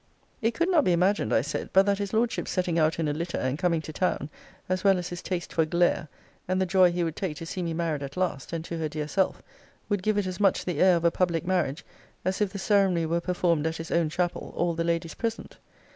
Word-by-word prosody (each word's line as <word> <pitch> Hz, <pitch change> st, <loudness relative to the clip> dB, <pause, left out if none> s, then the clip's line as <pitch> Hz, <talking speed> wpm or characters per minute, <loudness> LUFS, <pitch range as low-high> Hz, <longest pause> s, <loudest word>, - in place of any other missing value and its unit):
It 225 Hz, +1 st, +1 dB
could 340 Hz, -, +1 dB
not 320 Hz, -5 st, +5 dB
be 180 Hz, -, +3 dB
imagined, 180 Hz, -, +2 dB
I -, -, +4 dB
said, 145 Hz, +5 st, -4 dB
but 190 Hz, +1 st, +6 dB
that 200 Hz, -1 st, +1 dB
his 200 Hz, -1 st, -3 dB
Lordship's 230 Hz, +2 st, 0 dB
setting 180 Hz, -3 st, 0 dB
out 155 Hz, 0 st, +2 dB
in 165 Hz, -2 st, 0 dB
a 145 Hz, -, 0 dB
litter, 170 Hz, +3 st, -3 dB
and 130 Hz, +3 st, -1 dB
coming 170 Hz, -3 st, +1 dB
to 155 Hz, -, -7 dB
town, 155 Hz, -4 st, -1 dB, 0.4 s
as 185 Hz, 0 st, -1 dB
well 195 Hz, -2 st, +5 dB
as 180 Hz, 0 st, -4 dB
his 175 Hz, 0 st, -6 dB
taste 180 Hz, -2 st, -4 dB
for 165 Hz, -, +3 dB
glare, 170 Hz, 0 st, +1 dB, 0.4 s
and 185 Hz, +1 st, 0 dB
the 190 Hz, -, +2 dB
joy 185 Hz, -1 st, +5 dB
he 175 Hz, 0 st, -1 dB
would 165 Hz, -2 st, -2 dB
take 170 Hz, -6 st, -3 dB
to 165 Hz, -, -6 dB
see 180 Hz, +3 st, -4 dB
me 165 Hz, -2 st, -2 dB
married 160 Hz, -3 st, -1 dB
at 140 Hz, +2 st, -7 dB
last, 180 Hz, -8 st, -2 dB
and 165 Hz, -1 st, -4 dB
to 170 Hz, -1 st, -5 dB
her 155 Hz, -1 st, -1 dB
dear 150 Hz, 0 st, -4 dB
self, 190 Hz, +5 st, 0 dB, 0.5 s
would 205 Hz, -3 st, 0 dB
give 215 Hz, +2 st, +1 dB
it 205 Hz, -, +1 dB
as 185 Hz, -1 st, -4 dB
much 200 Hz, -2 st, +2 dB
the 175 Hz, -5 st, -2 dB
air 185 Hz, -1 st, +6 dB
of 170 Hz, -, -2 dB
a 170 Hz, -, +5 dB
public 170 Hz, -2 st, 0 dB
marriage 175 Hz, -6 st, 0 dB, 0.4 s
as 185 Hz, +2 st, -1 dB
if 205 Hz, -2 st, +1 dB
the 200 Hz, -, -6 dB
ceremony 190 Hz, -4 st, +2 dB
were 170 Hz, +2 st, 0 dB
performed 170 Hz, -3 st, +1 dB
at 160 Hz, -, -3 dB
his 165 Hz, 0 st, -7 dB
own 170 Hz, -2 st, +2 dB
chapel, 175 Hz, +2 st, -2 dB
all 175 Hz, -1 st, +1 dB
the 165 Hz, 0 st, -1 dB
Ladies 170 Hz, -1 st, -1 dB
present. 230 Hz, -1 st, -4 dB
175 Hz, 260 wpm, -27 LUFS, 165-185 Hz, 0.5 s, but